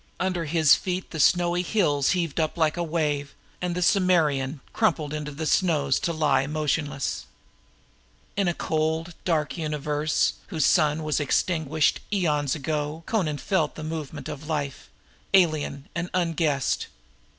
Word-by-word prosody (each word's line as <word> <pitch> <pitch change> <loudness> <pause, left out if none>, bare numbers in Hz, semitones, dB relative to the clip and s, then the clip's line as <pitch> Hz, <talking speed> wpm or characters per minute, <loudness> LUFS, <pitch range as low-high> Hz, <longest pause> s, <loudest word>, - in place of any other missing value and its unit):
Under 180 -2 -1
his 155 -1 +5
feet 185 0 -1
the 160 - -5
snowy 175 +3 +3
hills 165 -8 +2
heaved 165 -3 -2
up 155 +1 0
like 160 -2 +2
a 175 - -2
wave, 150 -4 -1 0.3
and 180 -1 -1
the 180 - -2
Akbitanan 160 -8 +2
crumpled 155 -9 +1
into 150 -1 -4
the 150 +2 -5
snows 150 -6 +2
to 170 - -1
lie 145 -4 +2
motionless. 150 - -2 1.1
In 200 -1 +1
a 175 - +2
cold 160 +2 -1
dark 160 -1 0
universe, 150 -1 0
whose 160 -7 0
sun 155 -2 +3
was 155 0 0
extinguished 155 0 +1
eons 150 -8 +1
ago, 150 +2 -3
Amra 160 -9 +1
felt 190 +5 0
the 155 - -7
movement 155 -2 -5
of 150 0 -7
life, 145 - -3 0.5
alien 155 -6 +2
and 170 +1 -3
unguessed. 165 -6 0
155 Hz, 140 wpm, -25 LUFS, 145-170 Hz, 1.1 s, his